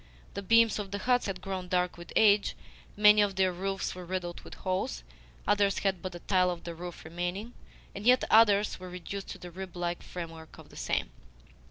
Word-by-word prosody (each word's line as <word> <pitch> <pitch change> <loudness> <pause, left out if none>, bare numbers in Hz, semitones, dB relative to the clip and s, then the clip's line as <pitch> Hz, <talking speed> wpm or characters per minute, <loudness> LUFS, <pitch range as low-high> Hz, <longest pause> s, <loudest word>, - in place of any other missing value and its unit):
The - - -4
beams 230 +2 +4
of 200 -2 -4
the 200 - -3
huts 245 +3 +1
had 185 -2 -4
grown 190 -2 -4
dark 180 -1 0
with 170 0 -11
age, 210 -2 +4 0.4
many 210 0 +7
of 200 -2 +1
their 190 0 +3
roofs 195 +2 -2
were 180 - -8
riddled 175 -1 -4
with - - -11
holes, 185 - -2 0.4
others 200 -1 +3
had 190 -3 0
but 185 -1 -5
a - - -7
tile 185 -2 +2
of 175 -1 -4
the 170 - -5
roof 175 0 -8
remaining, 175 +7 -4 0.4
and 200 - -7
yet 250 +3 +5
others 210 -3 +5
were 185 0 -8
reduced 180 +2 -6
to - - -7
the 180 - -10
rib 185 0 -8
like 175 0 -2
framework 165 -3 -8
of - - -14
the - - -16
same. - - -1
185 Hz, 205 wpm, -30 LUFS, 175-205 Hz, 0.4 s, many